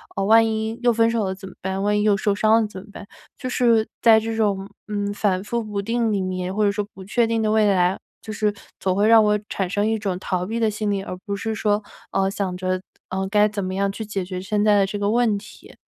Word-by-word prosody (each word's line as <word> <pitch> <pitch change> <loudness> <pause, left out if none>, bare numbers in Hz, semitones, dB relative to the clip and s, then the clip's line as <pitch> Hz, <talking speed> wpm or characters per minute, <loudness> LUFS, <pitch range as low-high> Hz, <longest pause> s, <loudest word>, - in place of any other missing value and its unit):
呃， 195 - -1
万 225 +2 +6
一 220 +1 -2
又 245 - +5
分 230 0 +3
手 230 -2 0
了 190 0 -2
怎 190 0 -10
么 - - -15
办？ 190 +1 -2
万 210 0 +2
一 - - +1
又 210 -2 +4
受 205 +1 +1
伤 220 +2 +3
了 220 - -1
怎 190 -3 -9
么 205 - -16
办？ 205 - -10 0.3
就 255 - -5
是 230 -3 +3 0.2
在 225 -2 +7
这 225 +1 -3
种， 200 -3 0 0.2
嗯， 205 -1 -2
反 195 -2 0
复 235 +3 -2
不 210 -2 -3
定 230 +2 0
里 200 -2 0
面， 185 0 -3
或 215 - +1
者 200 - +3
说 205 0 -2
不 190 - -11
确 230 +3 +1
定 225 0 0
的 215 - +1
未 215 -1 +4
来， 180 0 +2 0.2
就 215 - -7
是 210 0 0 0.3
总 185 -1 0
会 205 +2 +3
让 225 -1 +7
我 210 0 +2
产 195 -2 -2
生 205 +2 0
一 220 -1 0
种 195 -4 -2
逃 180 -1 -2
避 225 +4 -3
的 220 -2 +2
心 210 0 -2
理， 200 -1 -1
而 185 - -6
不 200 -2 -2
是 220 +2 -3
说， 210 -1 0 0.3
呃， 195 0 +1
想 195 -3 -3
着， 185 0 -2 0.3
呃， 190 +1 -2
该 210 +1 +4
怎 205 -1 -4
么 185 0 -3
样 200 0 0
去 220 +2 -6
解 200 -3 -3
决 185 0 -5
现 205 +2 0
在 210 -1 +4
的 195 - +4
这 195 +2 -4
个 205 0 0
问 230 -3 +2
题。 200 - -13
205 Hz, 290 characters per minute, -22 LUFS, 195-220 Hz, 0.3 s, 在